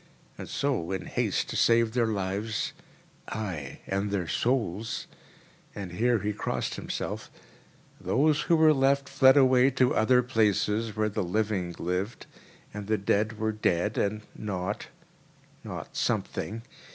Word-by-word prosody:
And - - -8
so, 130 -12 -1
in 95 - -3
haste - - -1
to - - -4
save 115 -1 +4
their 120 -2 +2
lives 105 +1 -2 0.5
(aye, 90 -11 -5
and 100 +1 -1
their 95 -4 -1
souls!—and 105 -4 -4
here 120 +6 +2
he 105 0 -2
crossed - - -2
himself) - - -4 0.7
those 150 +3 +2
who 170 - +6
were 160 -1 +6
left 140 0 +2
fled 135 0 +5
away 130 -1 +6
to 130 -1 +2
other 125 +3 +4
places, 110 -2 +1
where 110 0 +1
the 105 - -2
living 95 -2 -1
lived, 90 +6 -3 0.5
and 105 -1 -6
the 110 0 +2
dead 105 +2 0
were 110 0 0
dead 105 -1 0
and 105 +1 -1
not—not 100 -1 -7
something. 115 +2 -2
110 Hz, 130 wpm, -28 LUFS, 100-125 Hz, 0.7 s, who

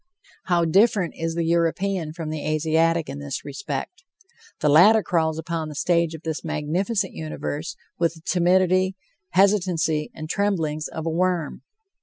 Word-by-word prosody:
How 175 -2 +2
different 195 +1 +3
is 165 0 -3
the 170 - 0
European 170 +1 0
from 160 -1 -6
the 155 -1 -4
Asiatic 160 +2 +1
in 135 +1 -6
this 145 -1 -5
respect! 205 - -5 0.6
The - - +1
latter 195 +9 +6
crawls 160 -2 0
upon 160 -1 -3
the 150 - -8
stage 170 +1 +1
of 160 - -11
this 160 -1 -4
magnificent 180 +8 -1
universe 155 +2 -5 0.2
with 170 -1 +1
the 160 - -15
timidity, 185 +1 +2 0.4
hesitancy 180 -6 +2
and 155 0 -6
tremblings 160 -6 -1
of 160 - -6
a 165 - 0
worm. 175 -2 -1
165 Hz, 150 wpm, -23 LUFS, 155-185 Hz, 0.6 s, latter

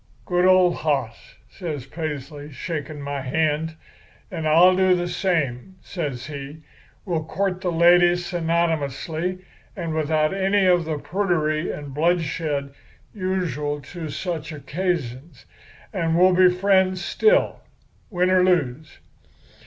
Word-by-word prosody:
"'Good 180 0 +1
old 185 -1 +5
hoss!' 135 -7 -2
says 155 -9 -6
Paisley, 150 -1 -6
shaking 150 0 -5
my 140 0 -4
hand. 155 +3 -1 0.6
'And 160 -4 -3
I'll 175 +4 +6
do 185 -1 +4
the 175 0 -2
same,' 170 -4 -1
says 140 -9 -4
he. 145 +1 -8 0.4
'We'll 165 -5 -2
court 185 +2 -2
the 180 -2 -1
lady 175 +1 +5
synonymously, 170 0 -2 0.3
and 165 -3 -3
without 155 0 +1
any 195 +1 +2
of 175 -2 +3
the 155 -1 -2
prudery 155 -1 -1
and 145 -2 -7
bloodshed 155 -3 -1 0.4
usual 180 -7 -2
to 165 -3 -5
such 160 0 -4
occasions. 150 -2 -4 0.5
And 165 0 0
we'll 185 +1 +5
be 185 0 +6
friends 185 0 +2
still, 455 +3 +2 0.5
win 180 -2 +1
or 185 -1 +4
lose. 155 -5 0
165 Hz, 120 wpm, -23 LUFS, 150-180 Hz, 0.6 s, I'll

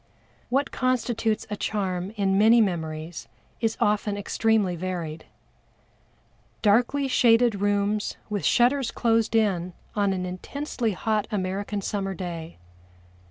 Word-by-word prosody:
What 275 +3 +1
constitutes 240 -4 0
a - - 0
charm 190 -3 -2
in 195 -1 +2
many 220 +4 +6
memories 160 -5 -2 0.3
is 225 -1 0
often 210 0 +1
extremely 205 -2 +1
varied. 170 -3 -4 1.4
Darkly 245 +6 +3
shaded 235 -4 +4
rooms 205 +1 0
with 210 -2 -3
shutters 250 +1 +3
closed 230 -1 +1
in 185 -5 +1 0.2
on 200 -2 +2
an 185 -1 -2
intensely 230 +5 -3
hot 215 +2 -1
American 200 0 -2
summer 195 -1 -2
day. 170 -2 -6
205 Hz, 115 wpm, -25 LUFS, 185-225 Hz, 1.4 s, many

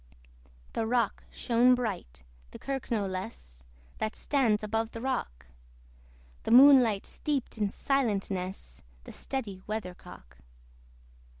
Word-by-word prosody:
The 225 - -1
rock 235 -2 0
shone 245 +1 +3
bright, 185 - -5 0.3
the - - -10
kirk 270 -2 -5
no 215 -4 0
less, 185 - -7 0.3
That 215 - -2
stands 235 -7 +1
above 225 +1 -2
the 230 - -6
rock: 145 - -3 1.0
The - - -5
moonlight 245 -4 +7
steeped 275 -6 -3
in 205 -1 +1
silentness 195 - -2 0.2
The - - -10
steady 215 -9 -5
weathercock. 180 - -7
220 Hz, 110 wpm, -29 LUFS, 185-250 Hz, 1.0 s, moonlight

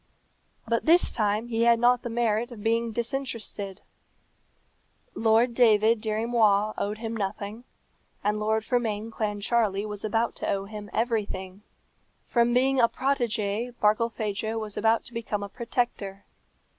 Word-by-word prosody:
But 230 +4 0
this 345 +3 +5
time 215 +1 0
he 225 -1 0
had 235 0 +5
not 245 +1 +4
the 240 - -5
merit 230 0 0
of 215 -4 -9
being 230 +1 +1
disinterested. 230 -5 -4 1.3
Lord 225 +2 +3
David 225 -2 +4
Dirry 220 0 -1
Moir 215 -3 +3
owed 210 +1 -2
him 225 0 -4
nothing, 205 +2 -4 0.6
and 210 +1 0
Lord 220 +1 0
Fermain 225 -3 -1
Clancharlie 210 -1 0
was 210 -1 -4
about 225 +2 0
to - - -3
owe 195 0 -1
him 210 0 -8
everything. 205 -4 -2 0.6
From 235 -1 +2
being 260 +2 +3
a 235 -1 +5
protégé 240 -3 -1
Barkilphedro 220 0 0
was 215 -2 -4
about 225 +1 +2
to 240 - -10
become 220 -3 -3
a 200 - -6
protector. 220 -4 -3
225 Hz, 140 wpm, -27 LUFS, 210-235 Hz, 1.3 s, this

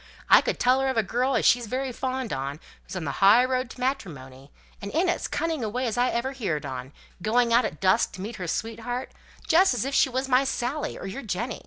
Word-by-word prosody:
"I - - +9
could - - -2
tell 255 +2 +3
her 270 - 0
of 260 -2 -1
a 225 - +3
girl 250 +6 0
as - - +1
she's 240 -1 +4
very 260 +3 -2
fond 255 - -3
on, 135 +2 -4 0.2
who's 185 - -10
on 180 - -3
the 140 - -1
high 215 +6 +7
road 255 -1 -1
to 255 - -12
matrimony; 145 - -4 0.3
and 200 - -5
in 340 +5 +1
as 350 - 0
cunning 320 -4 -2
a 215 - -1
way 250 +4 -2
as 230 - -1
ever 245 +1 0
I - - -9
heerd 180 - -3
on; 130 -1 -6 0.3
going 235 +3 +2
out 240 +2 +5
at 155 - -5
dusk 195 +4 +2
to 185 - -8
meet 215 +3 -6
her 180 -3 -5
sweetheart, 230 +6 -4 0.4
just 340 -3 +4
as 245 - -1
if 275 - -3
she 270 - +4
was 260 +1 -2
my 255 0 +4
Sally, 270 +2 -3
or - - -8
your 195 +8 -5
Jenny. 225 +1 -3
245 Hz, 245 wpm, -26 LUFS, 195-260 Hz, 0.4 s, I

